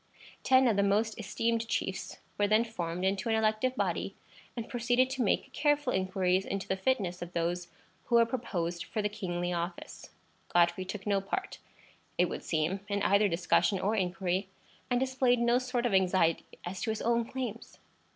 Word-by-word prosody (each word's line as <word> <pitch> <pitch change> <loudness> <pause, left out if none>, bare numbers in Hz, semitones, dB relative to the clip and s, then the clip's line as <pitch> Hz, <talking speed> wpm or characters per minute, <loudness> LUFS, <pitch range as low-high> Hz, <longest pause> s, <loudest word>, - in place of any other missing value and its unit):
Ten 260 0 +5
of 220 -4 +2
the - - +4
most 210 +3 +1
esteemed 230 +2 -1
chiefs 190 -3 -3 0.2
were 205 - +2
then 215 +2 +4
formed 180 -5 -3
into 195 +3 0
an 225 - +3
elective 220 +4 +1
body, - - -1 0.4
and 230 - -4
proceeded 245 +2 +1
to 265 -1 -2
make 215 - 0
careful 290 -3 +1
inquiries 185 0 +1
into 195 0 -4
the 190 - 0
fitness 190 -4 -1
of 175 0 -7
those 175 +1 -1 0.4
who 240 - +1
were 235 0 +7
proposed 180 -8 -3
for 215 - -3
the 210 - +1
kingly 180 -4 -3
office. 170 +1 -5 0.4
Godfrey 175 +1 +3
took 195 +1 -6
no 200 -2 +2
part, 375 - -4 0.6
it - - +4
would - - -5
seem, 160 +4 0
in 200 -1 -1
either 200 +1 +4
discussion 180 +3 +2
or 205 +4 0
inquiry, 185 0 -1 0.4
and 245 -1 +2
displayed 260 -1 +2
no 235 +1 +3
sort 250 -1 -2
of 235 - +1
anxiety 185 -3 +3 0.2
as 185 +2 -5
to 235 - -1
his 220 - -2
own 235 0 +2
claims. 235 -2 -6
205 Hz, 180 wpm, -30 LUFS, 185-235 Hz, 0.6 s, were